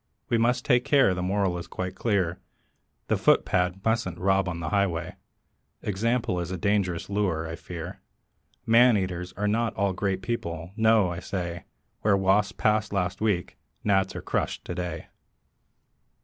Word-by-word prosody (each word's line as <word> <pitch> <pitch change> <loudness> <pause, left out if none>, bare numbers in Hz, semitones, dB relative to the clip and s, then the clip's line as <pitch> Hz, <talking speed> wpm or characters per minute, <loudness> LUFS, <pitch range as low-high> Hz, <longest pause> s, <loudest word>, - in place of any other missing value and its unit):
We 115 - +2
must 120 +2 +1
take 120 0 +4
care; 135 -9 +4
the 90 - -3
moral 95 -1 0
is 85 - -8
quite 90 0 -4
clear 95 -6 0 0.7
The - - +2
footpad 90 +1 +2
mustn't 110 -6 0
rob 95 0 +2
on 85 -1 -4
the 80 -2 -3
highway. 90 -5 0 0.7
Example 110 0 0
is 85 0 -3
a 95 - -3
dangerous 95 -2 0
lure, 95 -6 -1
I 80 - -5
fear: 85 +1 -8 0.6
Men 115 0 +6
eaters 90 -2 -3
are 105 +2 -2
not 115 +1 0
all 100 -1 +1
great 95 0 -2
people; 85 -8 -4
no, 110 -4 +4
I 85 - -4
say, 85 -2 -4 0.4
Where 100 -2 +3
wasps 95 +1 +3
passed 105 -1 +1
last 95 -1 -1
week 100 -5 -1 0.2
gnats 95 -2 +2
are - - -5
crushed - - -2
to - - -4
day. 90 -1 -4
95 Hz, 160 wpm, -26 LUFS, 90-105 Hz, 0.7 s, Men